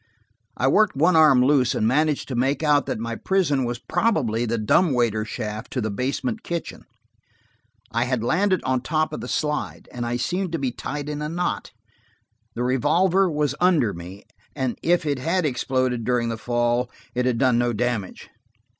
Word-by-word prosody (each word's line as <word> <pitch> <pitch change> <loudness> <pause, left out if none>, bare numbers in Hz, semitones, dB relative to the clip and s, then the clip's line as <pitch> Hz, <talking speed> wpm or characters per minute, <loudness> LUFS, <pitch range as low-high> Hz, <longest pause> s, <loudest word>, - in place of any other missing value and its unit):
I 130 - +1
worked 205 +7 +3
one 165 +5 +3
arm 145 -6 +6
loose 135 -3 +3
and - - 0
managed 150 +4 +1
to 130 - -3
make 135 +6 0
out 145 -2 +3
that - - -2
my 115 +1 -4
prison 150 -6 +1
was 120 0 -3
probably 120 - 0
the 115 +1 0
dumb 135 - +3
waiter 115 -3 +1
shaft 110 0 -5
to 130 - -1
the 110 -3 -2
basement 140 - -2
kitchen. 170 -1 -5 1.1
I 115 +1 +1
had 125 -3 -1
landed 185 +7 +1
on 130 -1 0
top 155 +3 -1
of - - -5
the - - -6
slide, 150 -1 -2
and 120 - -5
I 120 +1 -1
seemed 180 +5 -2
to - - +1
be 135 -4 -1
tied 145 +4 -5
in 150 0 -4
a 150 - -3
knot. 175 +2 -2 0.9
The 120 - -2
revolver 170 +9 +2
was 150 -3 0
under 165 - +3
me, 90 +4 -10 0.3
and 130 -4 -1
if 175 -1 +2
it 145 -3 -1
had 170 +5 0
exploded 130 -2 0
during 120 0 0
the 115 - -2
fall 120 +1 0 0.2
it 125 0 0
had 125 -2 +1
done 125 -1 +3
no 120 0 +1
damage. 115 -4 -3
130 Hz, 185 wpm, -23 LUFS, 120-155 Hz, 1.1 s, arm